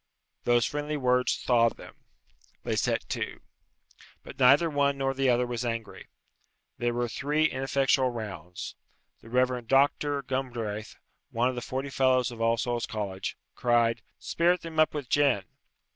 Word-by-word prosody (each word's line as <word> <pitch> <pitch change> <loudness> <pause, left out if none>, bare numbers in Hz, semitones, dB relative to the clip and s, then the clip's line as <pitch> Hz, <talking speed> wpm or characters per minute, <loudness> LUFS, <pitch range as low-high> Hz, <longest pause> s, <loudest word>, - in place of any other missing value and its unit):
Those 120 -1 +4
friendly 150 +1 -3
words 125 -2 +2
thawed 115 -2 +2
them. - - -12 0.7
They - - -1
set - - 0
to. - - -3 0.8
But - - -11
neither 140 +6 +6
one 140 -2 +1
nor 135 0 0
the 135 0 +1
other 125 0 +3
was 120 0 -3
angry. 115 -2 -5 0.7
There 120 0 0
were 120 0 0
three 150 +6 0
ineffectual 135 -1 +2
rounds. 90 -7 -6 0.5
The 115 - -15
Rev. 125 -1 +1
Doctor 140 +1 +2
Gumdraith, 120 -5 -4 0.3
one 120 +2 +1
of - - -3
the 120 - -4
forty 135 +3 -4
Fellows 130 -2 +2
of 115 -1 -8
All 115 0 +3
Souls' 120 0 -1
College, 100 -3 -4 0.2
cried, 120 -1 +2 0.2
"Spirit 175 +2 +1
them 160 -1 -5
up 155 0 +3
with 145 -4 -4
gin." 135 -8 +3
125 Hz, 150 wpm, -28 LUFS, 115-140 Hz, 0.8 s, neither